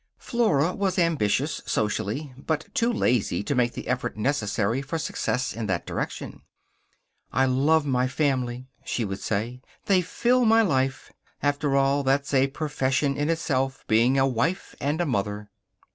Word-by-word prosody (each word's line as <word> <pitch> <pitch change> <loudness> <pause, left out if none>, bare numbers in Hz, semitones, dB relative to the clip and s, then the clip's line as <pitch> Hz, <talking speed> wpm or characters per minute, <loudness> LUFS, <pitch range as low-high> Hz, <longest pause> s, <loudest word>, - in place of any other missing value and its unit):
Flora 185 - +1
was 195 -2 -1
ambitious, 155 - +1
socially, 110 +7 -1
but 155 +5 -3
too 235 +1 +2
lazy 115 - +1
to 145 - -1
make 120 -2 +1
the - - -7
effort 120 -3 -2
necessary 115 -1 0
for 145 +4 -3
success 150 -5 -2
in 115 -2 -4
that 90 -4 -1
direction. - - -5 0.9
"I 130 +1 +3
love 145 +4 +3
my 130 -2 +1
family," 130 -3 -1 0.2
she 115 - -2
would 95 -1 -4
say. 115 +4 -2 0.2
"They 190 -2 +4
fill 245 +8 +1
my 225 0 +5
life. 135 -7 0 0.3
After 145 -1 +1
all, 140 +1 +3
that's 140 +1 0
a 135 0 +4
profession 140 -1 -1
in 145 +2 -1
itself 135 -5 -1
being 120 +5 +3
a 135 - +4
wife 135 +9 -1
and 155 +5 0
mother." 105 -5 -2
135 Hz, 150 wpm, -25 LUFS, 120-155 Hz, 0.9 s, my